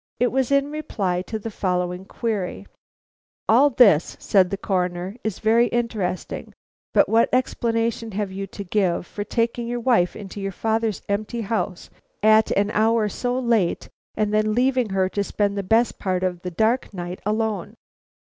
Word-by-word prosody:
It 245 0 +2
was 265 -1 +1
in 280 +1 +2
reply 195 -12 -2
to 220 - -3
the 220 +1 -6
following 180 -1 -2
query: 210 -4 -3 0.8
"All 255 +6 +6
this," 210 - +4
said 190 -3 +3
the 200 - -3
Coroner, 180 0 -2
"is 220 -4 -2
very 230 +2 +3
interesting; 225 -7 -3 0.4
but - - +4
what 225 +1 +3
explanation 230 -3 0
have 205 -1 -2
you 195 +1 -5
to 200 - -7
give 185 -2 0
for 205 - -5
taking 235 +2 -1
your 240 0 -2
wife 230 -7 +2
into 200 -1 -8
your 195 0 -3
father's 220 0 -1
empty 215 +3 -2
house 205 -4 -3 0.3
at 220 0 +5
an 205 +1 +2
hour 220 0 +2
so 245 +4 -2
late, 230 -8 +1 0.3
and 210 -1 0
then 215 0 +2
leaving 255 -2 +2
her 190 -1 +1
to 200 +1 -1
spend 200 0 -1
the 200 - -1
best 225 +5 +2
part 185 -2 -1
of 180 -2 -1
the 180 - -4
dark 220 +8 +1
night 175 0 -6
alone?" 215 -1 -2
215 Hz, 165 wpm, -23 LUFS, 190-230 Hz, 0.8 s, All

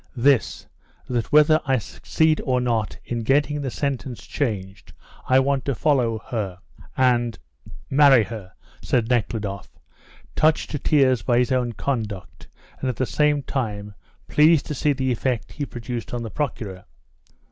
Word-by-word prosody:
"This: 130 0 +2 0.4
that 120 -2 -2
whether 150 +1 +5
I 135 -2 +2
succeed 155 +7 0
or 130 -3 +1
not 115 -4 -1
in 120 - -3
getting 145 +4 +1
the 135 - -2
sentence 130 -1 -4
changed 100 -7 -4 0.4
I 130 +1 +6
want 135 0 +1
to 140 - -1
follow 125 -5 +1
her, 100 -6 -3 0.4
and 120 -3 +2 0.5
marry 135 -4 +6
her," 105 -4 -8 0.3
said 115 -2 0
Nekhludoff, 105 -5 -2 0.7
touched 155 0 +2
to 150 - -2
tears 130 -6 +3
by 120 +2 +1
his 125 +2 +2
own 125 -2 0
conduct, 110 -6 -4 0.3
and 130 - -1
at 125 - -2
the 130 - 0
same 145 +6 +1
time 105 -7 -4 0.3
pleased 155 0 +4
to - - -4
see 145 +1 +1
the 130 -1 -1
effect 120 -2 -2
he 145 -2 -4
produced 120 0 -6
on 120 - -3
the 110 - -6
Procureur. 105 -7 -4
125 Hz, 150 wpm, -23 LUFS, 115-140 Hz, 0.7 s, I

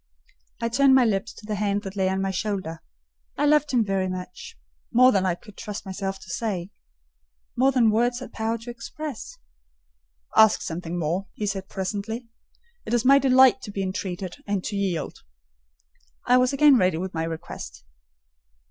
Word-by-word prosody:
I 230 - -1
turned 265 +2 +5
my 260 -2 +5
lips 200 -3 0
to 215 - -14
the 210 - -3
hand 205 0 -1
that 195 0 -7
lay 190 -1 +1
on 190 0 -1
my 195 - -1
shoulder. 190 -4 -3 0.6
I 290 - +1
loved 300 0 +3
him 240 -5 +2
very 195 -1 0
much—more 180 - 0
than 190 -3 +1
I 175 - +1
could 210 +2 -16
trust 210 -2 -6
myself 195 0 -4
to 190 - -13
say—more 170 - -4
than 240 -4 +4
words 240 +3 +1
had 260 - -10
power 225 +1 -1
to 230 +2 -8
express. 295 - -7 1.0
"Ask 220 -1 +5
something 170 +1 -4
more," 175 +4 -1
he 210 - -3
said 195 -1 -3
presently; 205 +5 -4 0.6
"it 240 - -1
is 240 +1 0
my 275 +2 +7
delight 260 -1 +5
to 225 - -8
be 195 -1 -3
entreated, 185 -1 -4
and 200 -2 -1
to 210 - -4
yield." 185 -6 -2 1.1
I 250 - +5
was 255 0 +3
again 280 -1 +6
ready 185 -5 +2
with 185 +2 -4
my 160 -1 -2
request. 165 -1 -7
200 Hz, 170 wpm, -25 LUFS, 185-240 Hz, 1.1 s, my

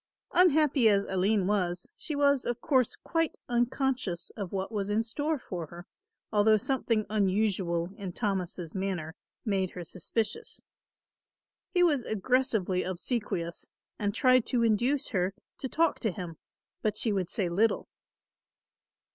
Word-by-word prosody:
Unhappy 300 -8 +5
as 200 -1 +3
Aline 190 +1 +1
was, 180 -3 0
she 305 - -4
was, 280 -2 +3
of 240 0 -2
course, 260 -5 +2
quite 330 -1 -1
unconscious 240 -6 0
of 200 -5 -6
what 195 +1 -3
was 205 -2 -2
in 215 +2 +2
store 295 +7 -1
for 175 - -6
her, 175 +3 -11 0.5
although 215 +1 +5
something 230 -2 0
unusual 190 -4 +1
in 195 -3 -5
Thomas' 180 -5 -2
manner 185 -5 -3 0.3
made 195 -4 +1
her 180 - -5
suspicious. 205 +6 -3 1.1
He 360 -1 +3
was 295 -8 +3
aggressively 220 -4 +1
obsequious 185 -3 -2 0.3
and 205 -1 +1
tried 255 +1 +4
to 240 -3 +2
induce 240 +5 +2
her 190 -2 0 0.2
to 265 - -4
talk 330 +4 +2
to 220 - 0
him, 175 -3 -7 0.4
but 215 -1 0
she 220 -1 +1
would 185 -3 -1
say 195 -5 0
little. 205 +6 +1
210 Hz, 140 wpm, -29 LUFS, 185-255 Hz, 1.1 s, Unhappy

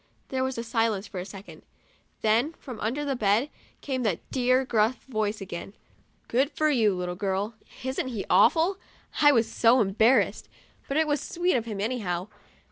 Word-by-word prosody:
There 260 -1 -1
was 260 0 -2
silence 225 -3 0
for 190 - -7
a 180 - -5
second, 195 0 -11 0.6
then, 230 +8 +2
from 250 -8 -10
under 260 +8 -2
the 275 -2 -1
bed, 220 +5 +1 0.3
came 260 -3 -2
that 205 -8 -2
dear, 255 0 +2
gruff 225 0 +1
voice 215 -4 -2
again, 190 +1 -7 0.3
" - - -39
Good 265 +4 +2
for 310 -1 +1
you, 220 -7 +3
little 180 0 -3
girl?'* 195 +3 -2 0.3
Isn't 260 0 -2
he 230 -6 -4
awful? 330 - +4 0.4
I 290 -1 +8
was 230 -4 +3
so 235 +2 +4
embarrassed; 220 +4 +2 0.4
but 275 - -1
it 315 - +4
was 295 -1 0
sweet 355 +1 0
of 235 -2 0
him, 215 -3 -5
anyhow. 200 -5 -2
230 Hz, 175 wpm, -27 LUFS, 205-265 Hz, 0.6 s, I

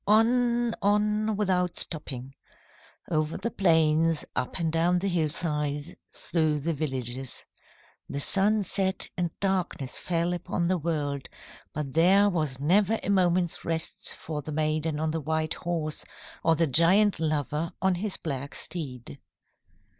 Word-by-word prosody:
On, 235 +2 +3
on, 210 +1 +2
without 180 -4 +1
stopping. 135 -5 -1 0.8
Over 155 -1 0
the 230 +5 -3
plains, 160 -3 +3
up 125 - -1
and 165 -3 0
down 170 +2 +3
the 190 +3 -1
hillsides, 150 -2 -1 0.2
through 155 -3 0
the 165 +3 -1
villages. 130 -4 -4 0.6
The 140 - -3
sun 205 +7 +2
set 190 0 0
and 175 -2 0
darkness 185 -9 -1
fell 170 0 0
upon 175 0 -2
the 185 0 +1
world, 145 -4 -2 0.4
but 145 -3 -4
there 190 +6 +5
was 155 -8 -1
never 200 +9 +3
a - - 0
moment's 180 -2 +2
rest 160 -1 -3
for 155 -2 -5
the 155 - -7
maiden 155 0 0
on 160 0 0
the 160 0 -2
white 155 +1 -1
horse 165 -3 -3 0.4
or 165 0 +4
the 165 +1 +2
giant 175 +7 +4
lover 155 +1 -1
on 190 -1 +2
his 190 +3 -2
black 140 -3 -5
steed. 125 - -6
165 Hz, 140 wpm, -27 LUFS, 150-190 Hz, 0.8 s, there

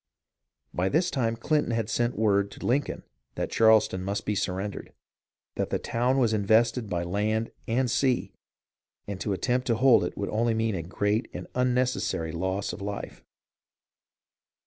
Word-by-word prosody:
By 90 +2 0
this 175 - +1
time 115 -4 0
Clinton 145 +2 0
had 115 -2 -1
sent 120 +2 0
word 100 -2 +2
to - - -9
Lincoln 140 +4 0 0.3
that - - -3
Charleston 110 -4 +4
must 100 +2 -3
be 105 - 0
surrendered, 95 +1 -3 0.6
that - - -1
the - - 0
town 125 +3 0
was 120 -4 +3
invested 110 +2 +2
by 85 -2 -1
land 105 +5 -1 0.2
and 125 +2 +1
sea, 125 +1 +1 0.7
and 100 -2 -6
to 105 - -1
attempt 125 +6 0
to 115 - +3
hold 125 +1 +5
it - - -4
would 100 - -2 0.3
mean 110 -1 0
only - - -2
a - - -2
great 105 +6 -1
and - - -5
unnecessary 125 -9 0
loss 95 +4 -2
of - - -8
life. 100 0 -6
110 Hz, 160 wpm, -27 LUFS, 100-125 Hz, 0.7 s, hold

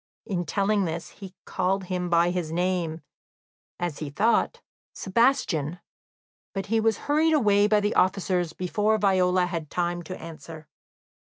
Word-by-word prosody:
In 185 -5 -2
telling 200 +3 +1
this, 160 -1 -4
he 190 -2 -12
called 190 +1 -1
him 180 -1 -3
by 170 0 +3
his 175 -3 -3
name, 175 -2 -1 0.8
as 175 -4 -3
he 150 - -4
thought 210 +11 +1 0.3
"Sebastian" 190 - +1 0.8
but 195 -1 -2
he 225 +2 +1
was 220 -1 +2
hurried 310 +2 +3
away 205 -6 +4
by 210 0 +3
the 205 +1 0
officers 185 -2 +1
before 210 +5 0
Viola 185 -3 +3
had 170 -4 -4
time 175 0 -1
to 180 +2 -8
answer. 160 -1 -10
185 Hz, 145 wpm, -26 LUFS, 170-205 Hz, 0.8 s, away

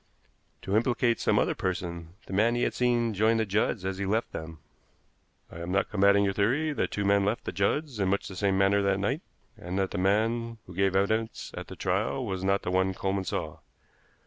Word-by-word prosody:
"To 95 - -1
implicate 120 +1 +2
some - - +2
other - - +2
person 85 -2 -4
the - - -8
man 115 +5 +3
he 120 - 0
had - - 0
seen 120 -2 +1
join 110 +3 +3
the 110 - +1
Judds 100 -1 0
as 95 0 -3
he 100 - -1
left 110 +4 0
them." 80 0 -7 0.9
"I 85 - -9
am 85 +1 -5
not 95 +1 0
combating 100 0 +4
your 100 -1 +1
theory 135 +11 +1
that - - -1
two 100 - -2
men 100 0 +4
left 105 +4 -1
the - - -4
Judds 115 - -1
in 95 - +1
much 100 +1 0
the 95 - -8
same 95 0 +1
manner 100 +1 +3
that 100 -1 +2
night, 130 - -1 0.3
and 90 +2 -5
that 95 -1 0
the 100 - -3
man 115 +4 +1
who 90 - -11
gave 95 +1 +1
evidence 110 +3 0
at - - -6
the - - -9
trial 110 +8 -1
was 95 -3 -3
not 100 +1 +1
the 90 - -2
one 95 +1 +1
Coleman 95 0 -1
saw. - - -4
100 Hz, 220 wpm, -28 LUFS, 95-115 Hz, 0.9 s, combating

